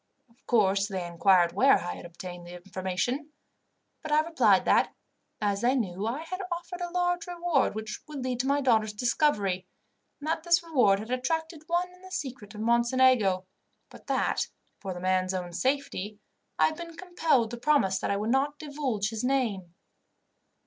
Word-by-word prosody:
Of 240 +4 -30
course, 200 -4 +3
they 190 -4 -4
inquired 175 0 +4
where 275 +2 +5
I 175 - -4
had - - -9
obtained 175 0 -9
the 175 - -9
information; 190 - -3 0.7
but 310 - -6
I 300 +1 +5
replied 250 - +3
that, - - +3 0.4
as 200 -1 0
they 250 +3 +3
knew, 200 -4 -2
I 265 +7 -3
had 370 +4 -5
offered 345 +1 -5
a 350 - -2
large 355 -1 0
reward 345 -9 +1
which 220 0 -5
would 290 -4 -6
lead 250 -1 -2
to 260 - 0
my 285 +1 +2
daughters' 220 -5 +2
discovery, 205 - +1 0.5
and 295 - -7
that 320 0 0
this 340 +1 +3
reward 250 -12 +3
had 220 +4 -7
attracted 320 +5 -2
one 355 +1 0
in 360 - -19
the 375 - -12
secret 255 - -6
of 210 - -6
Mocenigo, 235 -4 +3 0.5
but - - -15
that, - - 0 0.3
for 195 - -5
the - - -6
man's 185 0 +1
own 175 -1 -4
safety, 255 -5 -1 0.4
I - - +5
had 315 - -1
been 335 -1 -8
compelled 325 -10 +1
to 240 - -5
promise 235 -8 +2
that - - -2
I 200 - +1
would 215 +3 -1
not 280 +3 +1
divulge 280 -9 -2
his 225 0 -4
name. 220 -10 -1
245 Hz, 180 wpm, -28 LUFS, 195-305 Hz, 0.7 s, where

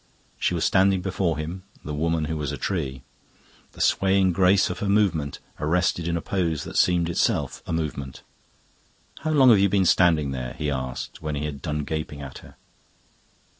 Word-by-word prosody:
She 90 - +1
was 85 - 0
standing 95 -1 +3
before 95 -4 -1
him, 80 +5 -5 0.2
the 75 - -4
woman 80 +1 0
who 80 - -3
was 75 -3 -3
a 70 - -4
tree, 65 -5 -3 0.7
the - - -15
swaying 95 -1 +3
grace 95 +2 +4
of - - -6
her 100 - -2
movement 85 -9 +1 0.2
arrested 85 +2 +1
in 85 0 0
a - - -3
pose 85 -5 -1
that - - -8
seemed 90 -2 +3
itself 85 - 0
a - - -4
movement. 75 -5 -4 1.0
"How 155 - -3
long 135 -5 +6
have 105 - +6
you 100 0 +4
been 95 -1 +2
standing 80 -6 +3
there?" 65 -2 -4
he 75 -1 -1
asked, 65 -1 -5
when 75 -1 -3
he 75 +1 -3
had 70 -2 -5
done 75 -2 -2
gaping 75 -1 -4
at 65 -2 -8
her. - - -15
80 Hz, 185 wpm, -24 LUFS, 75-95 Hz, 1.0 s, long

